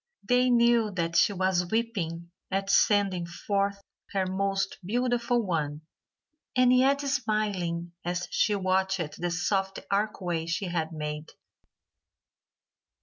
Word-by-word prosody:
They 250 0 +4
knew 235 -2 +4
that 170 -1 -1
she - - +5
was 185 -2 0
weeping 175 -7 -2 0.2
at 195 +1 -1
sending 195 -5 +3
forth 200 +3 -1 0.3
her 195 -1 +1
most 195 +1 -1
beautiful 240 +2 0
one, 150 -4 -2 0.7
and 255 0 +5
yet 275 +2 +4
smiling 210 -10 -1
as 180 +1 -2
she 210 - +2
watched 190 -4 -1
the 175 - 0
soft 195 +2 -1
archway 185 -5 -1
she 175 +4 -1
had 165 -2 -2
made. 150 -1 -5
195 Hz, 115 wpm, -28 LUFS, 175-220 Hz, 0.7 s, she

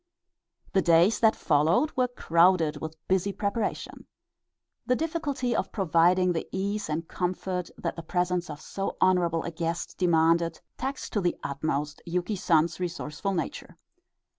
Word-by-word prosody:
The 195 - +4
days 170 +5 +4
that 220 -1 +4
followed 165 - +2
were 255 -1 +2
crowded 170 -7 +2
with 160 0 -6
busy 190 +1 +1
preparation. 205 +2 -3 0.8
The 250 - +3
difficulty 290 -6 -1
of - - -1
providing 180 -1 +3
the 165 - -3
ease 200 +1 -2
and 160 +2 -2
comfort 180 0 -3
that - - -3
the 165 - -6
presence 180 +1 -1
of 150 -1 -7
so 195 +4 -4
honorable 170 -3 +2
a 170 - -4
guest 165 +1 -4
demanded 165 -1 +3 0.2
taxed 265 +2 -5
to 205 - +1
the 175 -1 0
utmost 145 +1 -2
Yuki 180 +4 -1
San's 170 -2 +2
resourceful 180 +1 -3
nature. 165 -4 -5
180 Hz, 140 wpm, -27 LUFS, 165-200 Hz, 0.8 s, The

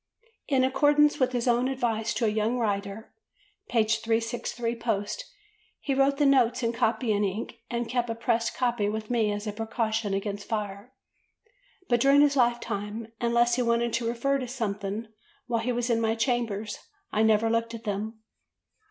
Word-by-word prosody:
In 265 -3 +3
accordance 295 +3 +4
with 255 -1 +2
his 245 -1 -1
own 245 +1 +3
advice 230 -4 -1
to 235 - +1
a - - +3
young 215 +3 0
writer 200 -1 -3 0.6
(p. 230 -2 +3
363 230 +1 -1
post), 230 - -3 0.5
he 275 - -2
wrote 275 +1 +3
the 295 - +3
notes 255 -2 +3
in 230 0 +1
copying 225 -2 +1
ink 205 +4 -3
and 235 -1 -2
kept 240 0 -1
a 230 - -2
pressed 230 0 0
copy 240 -5 +1
with 215 +1 -4
me 225 -3 +2
as 205 +1 -4
a 210 - -2
precaution 220 -1 -1
against 200 0 -4
fire; 210 +1 -4 1.0
but 240 - +3
during 275 +2 +6
his 290 -1 +4
lifetime, 230 -3 -1
unless 235 0 +3
he - - +2
wanted 235 -1 +1
to 235 -1 0
refer 275 +4 0
to 255 - -4
something 210 -3 -3 0.4
while 230 -2 -1
he 245 +2 -1
was 240 0 -1
in 230 -1 +2
my 225 0 +1
chambers, 225 -3 -1 0.3
I 215 - +1
never 220 0 +4
looked 230 0 0
at 230 - -9
them. 215 +1 -4
230 Hz, 170 wpm, -27 LUFS, 215-245 Hz, 1.0 s, during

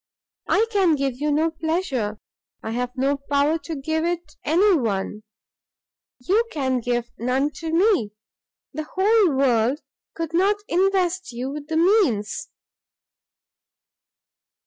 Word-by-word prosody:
I 440 - +4
can 380 -7 +3
give 270 -2 -2
you 300 0 +1
no 315 +3 +2
pleasure, 315 - -2 0.5
I 220 - -4
have 245 +2 -2
no 275 +2 +1
power 290 +3 +2
to 315 +2 -6
give 315 +3 -2
it 345 0 -3
any 370 +6 +4
one; 210 -5 -2 1.0
you 385 - +2
can 260 -4 0
give 240 0 -2
none 260 +5 0
to 325 -1 -4
me 340 - +2 0.6
the 305 +1 -5
whole 390 -4 +4
world 260 +1 +2 0.3
could 330 -1 -4
not 385 +4 +3
invest 375 -1 +1
you 250 +3 -4
with 295 0 -7
the 320 0 -1
means!" 330 - +2
300 Hz, 125 wpm, -23 LUFS, 255-350 Hz, 1.0 s, I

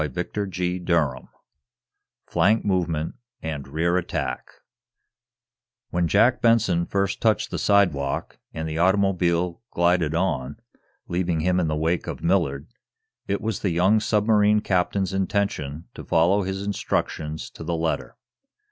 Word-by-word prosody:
CHAPTER 105 -1 -3
VI 90 -7 -1 1.0
FLANK 110 +3 +2
MOVEMENT 85 -5 0 0.3
AND 75 -3 -4
REAR 85 +5 0
ATTACK 90 - -3 1.4
When 85 -1 +1
Jack 115 +8 +3
Benson 100 -7 +3
first 100 0 -1
touched 110 -2 +1
the - - -2
sidewalk, 85 -10 +1
and 80 0 -4
the 80 +1 -3
automobile 90 -1 +2
glided 85 -2 +1
on, 80 -8 -1 0.5
leaving 85 -2 -1
him 90 +2 +2
in 85 - +1
the 75 - 0
wake 80 +3 -1
of - - -6
Millard, 80 -6 +1 0.6
it 100 - -1
was 110 -2 -2
the 100 - 0
young 90 +6 +3
submarine 105 0 +3
captain's 95 0 0
intention 95 -6 -1
to - - -9
follow 85 +5 +3
his 95 +1 -3
instructions 80 -6 -3
to - - -10
the 85 +1 -2
letter. 80 0 -2
90 Hz, 130 wpm, -24 LUFS, 80-100 Hz, 1.4 s, Jack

